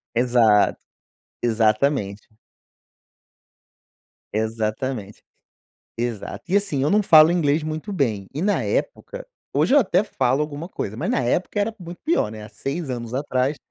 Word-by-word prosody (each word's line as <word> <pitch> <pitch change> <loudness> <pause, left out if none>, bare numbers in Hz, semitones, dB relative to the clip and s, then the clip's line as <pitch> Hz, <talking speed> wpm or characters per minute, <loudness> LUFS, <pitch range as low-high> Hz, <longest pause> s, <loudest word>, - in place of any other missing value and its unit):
Exato. 120 -4 +3 0.7
Exatamente. 110 -1 +1 2.1
Exatamente. 110 0 -3 0.8
Exato. 115 -3 -4
E, 190 - +2
assim, 195 -9 0
eu 145 - +1
não 210 +1 +4
falo 155 -2 +7
inglês 155 -3 +1
muito 155 +6 -4
bem, 110 - -1
e 145 - -4
na 205 +3 +1
época - - -3 0.3
hoje 265 - +2
eu - - +8
até 205 -1 +2
falo 130 -7 0
alguma 150 +3 -4
coisa, 105 - -5
mas - - -2
na - - +1
época 150 - -1
era 210 +2 0
muito 175 -1 -9
pior, 315 - +1
né, 110 -1 -9
há 105 - -10
6 140 +9 -5
anos 120 -2 -5
atrás, 130 +1 0
135 Hz, 140 wpm, -22 LUFS, 110-170 Hz, 2.1 s, eu